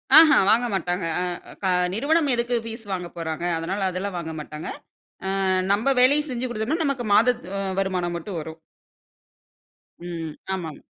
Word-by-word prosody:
அஹ 315 Hz, -1 st, +10 dB, 0.2 s
வாங்க 240 Hz, +3 st, +4 dB
மாட்டாங்க. 180 Hz, -1 st, -1 dB, 0.2 s
அ 180 Hz, -1 st, -4 dB
க 190 Hz, -, +1 dB, 0.3 s
நிறுவனம் 295 Hz, +6 st, +2 dB
எதுக்கு 240 Hz, 0 st, 0 dB
பீஸ் 225 Hz, 0 st, -6 dB
வாங்கப்போறாங்க, 170 Hz, -2 st, -4 dB
அதனால 190 Hz, +4 st, -2 dB
அதுலாம் 185 Hz, +1 st, -3 dB
வாங்க 160 Hz, -1 st, -4 dB
மாட்டாங்க. 150 Hz, +1 st, -7 dB, 0.8 s
அ -, -, +1 dB, 0.3 s
நம்ப 225 Hz, +7 st, +2 dB
வேலை 275 Hz, +4 st, +6 dB
செஞ்சு 255 Hz, 0 st, -2 dB
குடுத்தம்னா 240 Hz, +8 st, -1 dB
நமக்கு 265 Hz, -4 st, -1 dB
மாதத் 235 Hz, +3 st, +3 dB
அ -, -, -1 dB, 0.2 s
வருமானம் 180 Hz, -3 st, -1 dB
மட்டும் 175 Hz, +1 st, -5 dB
வரும். 160 Hz, +1 st, -8 dB, 1.5 s
ம். 165 Hz, -3 st, -5 dB, 0.2 s
ஆமாம். 160 Hz, -5 st, -6 dB
195 Hz, 145 wpm, -24 LUFS, 170-245 Hz, 1.5 s, அஹ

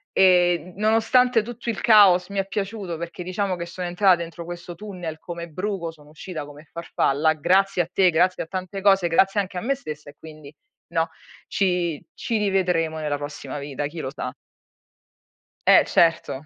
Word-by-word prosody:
e 175 Hz, -2 st, +4 dB
nonostante 225 Hz, +3 st, +3 dB
tutto 240 Hz, +1 st, -7 dB
il 215 Hz, -, -6 dB
caos 195 Hz, -5 st, +6 dB
mi 200 Hz, -, -6 dB
è 195 Hz, -, 0 dB
piaciuto 200 Hz, -3 st, -4 dB
perché 170 Hz, +2 st, -6 dB
diciamo 185 Hz, +1 st, -2 dB
che 170 Hz, -1 st, -5 dB
sono 180 Hz, +1 st, -5 dB
entrata 180 Hz, 0 st, +4 dB
dentro 170 Hz, 0 st, -7 dB
questo 175 Hz, 0 st, -8 dB
tunnel 175 Hz, -5 st, -7 dB
come 170 Hz, 0 st, -7 dB
bruco, 185 Hz, 0 st, -3 dB
sono 150 Hz, -2 st, -19 dB
uscita 155 Hz, -1 st, -7 dB
come 145 Hz, +2 st, -14 dB
farfalla, 155 Hz, -2 st, +1 dB
grazie 185 Hz, +4 st, +2 dB
a 165 Hz, -, -12 dB
te, 185 Hz, -2 st, +4 dB
grazie 180 Hz, +3 st, +2 dB
a -, -, -13 dB
tante 185 Hz, +2 st, -5 dB
cose, 195 Hz, -3 st, +4 dB
grazie 195 Hz, +5 st, +3 dB
anche 185 Hz, -1 st, -3 dB
a 180 Hz, -, -2 dB
me 275 Hz, +3 st, +1 dB
stessa 150 Hz, -, -8 dB
e -, -, -31 dB
quindi" 155 Hz, -2 st, -12 dB, 0.4 s
no, 165 Hz, 0 st, +1 dB, 0.4 s
"Ci 180 Hz, -5 st, 0 dB
ci 230 Hz, -2 st, -2 dB
rivedremo 180 Hz, -6 st, 0 dB
nella 150 Hz, -2 st, -2 dB
prossima 145 Hz, 0 st, -7 dB
vita, 145 Hz, 0 st, -4 dB
chi 165 Hz, +2 st, -9 dB
lo 130 Hz, -, -4 dB
sa." 130 Hz, -3 st, -5 dB, 1.3 s
Eh, -, -, +7 dB
certo. 165 Hz, -4 st, +1 dB
175 Hz, 175 wpm, -23 LUFS, 160-195 Hz, 1.3 s, Eh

